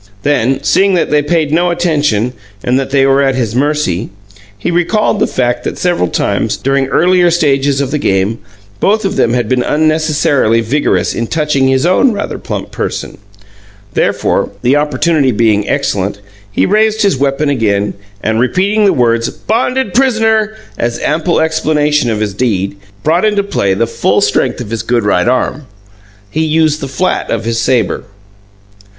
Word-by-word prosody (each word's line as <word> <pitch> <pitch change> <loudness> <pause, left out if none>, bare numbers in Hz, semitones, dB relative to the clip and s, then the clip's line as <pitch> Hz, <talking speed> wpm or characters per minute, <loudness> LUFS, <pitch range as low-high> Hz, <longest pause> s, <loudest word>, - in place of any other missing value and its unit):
Then, 135 -1 +1
seeing 195 +5 +3
that 175 - 0
they 150 0 +3
paid 155 0 0
no 175 +3 +2
attention 150 -10 0 0.3
and 125 +2 +1
that 135 - -3
they 135 0 +3
were 135 +1 +3
at 135 -1 +1
his 115 -5 -1
mercy, 135 - 0 0.5
he 100 - -2
recalled 195 +5 +1
the - - +2
fact 120 -1 -1
that - - -4
several 175 - 0
times, - - -1
during 135 0 0
earlier 180 +4 +3
stages 140 -5 +1
of 135 -1 -2
the 150 - -1
game, 100 -1 0 0.4
both 215 +1 +1
of 195 - -1
them 115 - +2
had 120 -3 0
been 125 +1 +1
unnecessarily 155 -6 +1
vigorous 130 +6 0
in 115 - -3
"touching" 150 -3 0
his 130 +2 +1
own 200 +8 +3
rather - - -4
plump - - -5
person. - - -4 0.7
Therefore, - - 0
the 125 +3 +3
opportunity 150 -1 +1
being 105 -2 +1
excellent, 100 +1 -1 0.3
he - - +1
raised 215 +2 +2
his 200 -7 +2
weapon 140 +2 0
again, 105 -6 0 0.3
and, 110 +1 0
repeating 195 - +1
the 195 - +4
words 115 -2 +1
"bonded 250 +4 -1
pris'ner" 225 -4 +2 0.2
as 120 0 -1
ample 160 +3 0
explanation 150 -3 +1
of 110 -1 -2
his 105 -2 -2
deed, 100 -4 -1 0.3
brought 165 +5 +2
into 210 -2 +2
play 100 - 0
the 115 - +1
full 115 - 0
strength - - 0
of 110 -3 -7
his 115 -2 -2
good 115 0 0
right 95 -2 +1
arm. 130 +2 -1 0.6
He 160 - 0
used 155 -1 +1
the 135 - -3
flat 160 +8 -1
of - - -1
the 115 +1 -2
sabre. 115 -3 0
140 Hz, 170 wpm, -13 LUFS, 115-170 Hz, 0.7 s, the